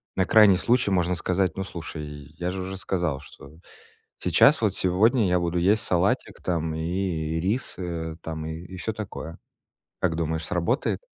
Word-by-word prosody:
на 95 Hz, -, +2 dB
крайний 105 Hz, -2 st, +6 dB
случай 120 Hz, +1 st, +2 dB
можно 90 Hz, -1 st, +2 dB
сказать: 90 Hz, 0 st, 0 dB
"Ну, 95 Hz, -, -1 dB
слушай, 85 Hz, -4 st, -6 dB, 0.3 s
я 90 Hz, +1 st, -1 dB
же 95 Hz, 0 st, -4 dB
уже 95 Hz, +1 st, -5 dB
сказал, 85 Hz, -7 st, -1 dB
что 70 Hz, -1 st, -14 dB, 0.7 s
сейчас, -, -, +5 dB
вот -, -, +1 dB
сегодня 105 Hz, +5 st, +3 dB
я 90 Hz, 0 st, +3 dB
буду 85 Hz, 0 st, 0 dB
есть 105 Hz, +6 st, +3 dB
салатик 90 Hz, -1 st, 0 dB
там 80 Hz, -3 st, -1 dB
и 80 Hz, -1 st, -2 dB
рис, 110 Hz, +8 st, -1 dB
э, 85 Hz, -3 st, -4 dB
там 80 Hz, -1 st, -5 dB
и 85 Hz, +4 st, -7 dB
всё 110 Hz, +5 st, -3 dB
такое". 95 Hz, -6 st, -7 dB, 0.6 s
Как 80 Hz, -, +1 dB
думаешь, 80 Hz, -1 st, -2 dB
сработает? 90 Hz, -, 0 dB
90 Hz, 160 wpm, -25 LUFS, 80-95 Hz, 0.7 s, крайний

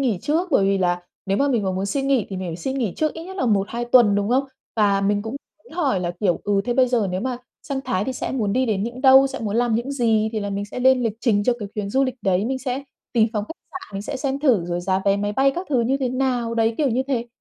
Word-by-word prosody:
nghỉ 235 Hz, -9 st, +1 dB
trước, 335 Hz, +5 st, 0 dB
bởi 200 Hz, -9 st, +4 dB
vì 195 Hz, 0 st, +2 dB
là 175 Hz, -1 st, +1 dB, 0.3 s
nếu 195 Hz, +1 st, +1 dB
mà 280 Hz, +1 st, +2 dB
mình 235 Hz, -6 st, +1 dB
mà 190 Hz, -, 0 dB
muốn 190 Hz, +1 st, -2 dB
xin 270 Hz, +6 st, -1 dB
nghỉ 265 Hz, -6 st, +2 dB
thì 190 Hz, -, -4 dB
mình 185 Hz, -1 st, -4 dB
phải 165 Hz, -, -4 dB
xin 265 Hz, +10 st, -3 dB
nghỉ 220 Hz, -8 st, -1 dB
trước 310 Hz, -1 st, 0 dB
ít 325 Hz, +1 st, -7 dB
nhất 380 Hz, +1 st, -9 dB
là 255 Hz, -, 0 dB
1-2 215 Hz, +3 st, 0 dB
tuần, 240 Hz, -4 st, +5 dB
đúng 205 Hz, +1 st, 0 dB
không? 260 Hz, +3 st, +2 dB, 0.3 s
Và 200 Hz, -2 st, +3 dB
mình 205 Hz, +1 st, +1 dB
cũng 225 Hz, +5 st, -5 dB, 0.4 s
hỏi 285 Hz, -, 0 dB
là, 175 Hz, -1 st, -1 dB
kiểu, 180 Hz, -5 st, +1 dB
ừ, 200 Hz, -1 st, +2 dB
thế 240 Hz, -, -1 dB
bây 255 Hz, -1 st, +4 dB
giờ 235 Hz, -5 st, +1 dB
nếu 185 Hz, -, -2 dB
mà 255 Hz, +2 st, -2 dB, 0.3 s
sang 275 Hz, -2 st, -3 dB
Thái 185 Hz, +2 st, 0 dB
thì 260 Hz, -, -2 dB
sẽ -, -, -4 dB
muốn 215 Hz, -6 st, 0 dB
đi 260 Hz, +1 st, +1 dB
đến 205 Hz, -3 st, 0 dB
những 235 Hz, +3 st, -5 dB
đâu, 265 Hz, 0 st, +7 dB
sẽ 270 Hz, -, -5 dB
muốn 215 Hz, 0 st, -2 dB
làm 240 Hz, -2 st, +2 dB
những 245 Hz, +5 st, -1 dB
gì, 225 Hz, -4 st, +2 dB
thì 215 Hz, -, -2 dB
là 205 Hz, -, -3 dB
mình 200 Hz, +1 st, -2 dB
sẽ 225 Hz, +4 st, -7 dB
lên 260 Hz, -1 st, +4 dB
lịch 220 Hz, -2 st, -1 dB
trình 210 Hz, -5 st, +2 dB
cho 250 Hz, -, +3 dB
cái 205 Hz, -2 st, -5 dB
chuyến 205 Hz, -2 st, -3 dB
du 270 Hz, +3 st, +2 dB
lịch 255 Hz, -, -2 dB
đấy, 190 Hz, +1 st, +1 dB
mình 260 Hz, +3 st, -1 dB
sẽ 255 Hz, +1 st, -3 dB, 0.3 s
tìm 225 Hz, -2 st, +3 dB
phòng 210 Hz, -3 st, -1 dB
khách 270 Hz, -, -8 dB, 0.2 s
sạn 370 Hz, -, -9 dB
mình 195 Hz, -, -3 dB
sẽ 275 Hz, +5 st, -4 dB
xem 270 Hz, 0 st, -2 dB
thử, 235 Hz, -, +3 dB
rồi 175 Hz, 0 st, -2 dB
giá 190 Hz, +1 st, 0 dB
vé 200 Hz, 0 st, +3 dB
máy 205 Hz, +1 st, -2 dB
bay 270 Hz, +5 st, +3 dB
các 360 Hz, +2 st, -4 dB
thứ 255 Hz, -4 st, +3 dB
như 255 Hz, +4 st, +1 dB
thế 260 Hz, -2 st, -1 dB
nào, 250 Hz, -3 st, -1 dB
đấy 225 Hz, 0 st, +2 dB
kiểu 295 Hz, -, +2 dB
như 255 Hz, +2 st, +1 dB
thế. 240 Hz, -3 st, -1 dB
230 Hz, 305 wpm, -22 LUFS, 200-265 Hz, 0.4 s, đâu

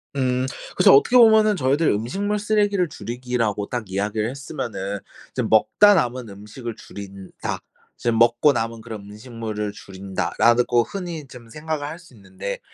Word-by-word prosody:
음. 130 Hz, -1 st, +1 dB, 0.3 s
그래서 -, -, +7 dB
어떻게 250 Hz, -, +5 dB
보면은 220 Hz, -3 st, +6 dB
저희들 145 Hz, +2 st, +1 dB
음식물 195 Hz, -, -1 dB
쓰레기를 205 Hz, -3 st, +1 dB
줄이기라고 120 Hz, -6 st, -3 dB
딱 120 Hz, -5 st, -4 dB
이야기를 105 Hz, +3 st, -1 dB
했으면은 115 Hz, -8 st, -5 dB, 0.3 s
이제 -, -, -2 dB
'먹다 205 Hz, -, +5 dB
남은 125 Hz, -, -1 dB
음식을 105 Hz, +4 st, -8 dB
줄인다. 100 Hz, -1 st, -7 dB, 0.4 s
지금 115 Hz, -1 st, 0 dB
먹고 120 Hz, +5 st, +5 dB
남은 115 Hz, -1 st, -3 dB
그런 110 Hz, -2 st, -8 dB
음식물을 110 Hz, -2 st, -5 dB
줄인다.'라르고 115 Hz, +5 st, +1 dB
흔히 175 Hz, -, -6 dB
좀 120 Hz, -3 st, -13 dB
생각을 150 Hz, +1 st, -4 dB
할 160 Hz, -, -6 dB
수 170 Hz, -7 st, -18 dB
있는데 100 Hz, -1 st, -6 dB
120 Hz, 355 characters per minute, -22 LUFS, 105-150 Hz, 0.4 s, 그래서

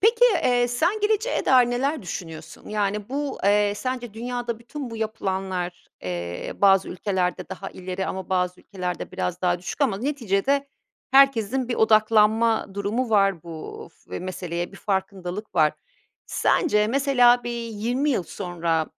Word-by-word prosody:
Peki, 455 Hz, +3 st, +5 dB, 0.2 s
eee, 245 Hz, -1 st, +3 dB
sen 340 Hz, -, +1 dB
geleceğe 435 Hz, +3 st, +1 dB
dair 250 Hz, -2 st, +5 dB
neler 275 Hz, +2 st, -1 dB
düşünüyorsun? 165 Hz, -3 st, -8 dB
Yani, 210 Hz, 0 st, -1 dB
bu, 280 Hz, +1 st, -3 dB
eee, 205 Hz, 0 st, +3 dB
sence 245 Hz, -1 st, -4 dB
dünyada 240 Hz, 0 st, -3 dB
bütün 245 Hz, +2 st, -7 dB
bu 225 Hz, -, -6 dB
yapılanlar, 190 Hz, -5 st, -3 dB, 0.2 s
eee, 85 Hz, -1 st, -4 dB
bazı 195 Hz, -1 st, +5 dB
ülkelerde 185 Hz, -1 st, -2 dB
daha 195 Hz, +1 st, -6 dB
ileri 185 Hz, +1 st, -4 dB
ama 190 Hz, -1 st, -5 dB
bazı 180 Hz, -1 st, 0 dB
ülkelerde 180 Hz, -3 st, -5 dB
biraz 180 Hz, 0 st, -3 dB
daha 175 Hz, -1 st, +2 dB
düşük 180 Hz, +11 st, -7 dB
ama 220 Hz, -9 st, +2 dB
neticede 275 Hz, +1 st, 0 dB, 0.4 s
herkesin 265 Hz, -2 st, +4 dB
bir 240 Hz, -, 0 dB
odaklanma 220 Hz, +1 st, +4 dB
durumu 220 Hz, +5 st, -1 dB
var 195 Hz, -5 st, +3 dB
bu 165 Hz, -1 st, -8 dB
f -, -, -9 dB
meseleye, 175 Hz, -1 st, -4 dB
bir -, -, -11 dB
farkındalık 195 Hz, 0 st, -3 dB
var. 155 Hz, -2 st, +4 dB, 0.5 s
Sence, 210 Hz, -, +2 dB
mesela, 245 Hz, -2 st, +4 dB
bir 240 Hz, -, -3 dB, 0.2 s
20 240 Hz, +7 st, -1 dB
yıl 230 Hz, -, +1 dB
sonra 170 Hz, -4 st, -2 dB
210 Hz, 140 wpm, -24 LUFS, 185-245 Hz, 0.5 s, Peki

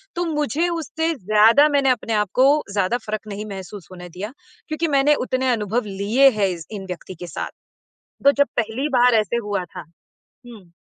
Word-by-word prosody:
तो 350 Hz, +1 st, -1 dB
मुझे 305 Hz, +1 st, -1 dB
उससे 325 Hz, 0 st, -2 dB
ज़्यादा 220 Hz, +6 st, +5 dB
मैंने 280 Hz, -2 st, +2 dB
अपने 230 Hz, -2 st, 0 dB
आप 210 Hz, -3 st, +1 dB
को 280 Hz, +4 st, +4 dB
ज़्यादा 200 Hz, +4 st, +1 dB
फ़र्क़ 215 Hz, 0 st, -5 dB
नहीं 205 Hz, +1 st, -5 dB
महसूस 195 Hz, 0 st, -8 dB
नहीं 185 Hz, -, -10 dB
होने 180 Hz, -, -9 dB
दिया, 210 Hz, +5 st, -5 dB, 0.3 s
क्योंकि 310 Hz, +1 st, -1 dB
मैंने 290 Hz, +2 st, +4 dB
उतने 260 Hz, 0 st, 0 dB
अनुभव 220 Hz, 0 st, -1 dB, 0.2 s
लिए 255 Hz, +7 st, +5 dB
हैं 200 Hz, -, +3 dB
इस 170 Hz, -2 st, -6 dB
इन 200 Hz, -3 st, -6 dB
व्यक्ति 180 Hz, +1 st, -7 dB
के 175 Hz, +1 st, -9 dB
साथ। 155 Hz, -, -5 dB, 0.7 s
तो 280 Hz, -, +7 dB
जब 285 Hz, 0 st, +2 dB
पहली 240 Hz, +5 st, -1 dB
बार 245 Hz, 0 st, +5 dB
ऐसे 215 Hz, +3 st, -2 dB
हुआ 200 Hz, -3 st, -1 dB
था -, -, -6 dB, 0.6 s
हुँ। 205 Hz, -8 st, -14 dB
230 Hz, 190 wpm, -21 LUFS, 200-280 Hz, 0.7 s, तो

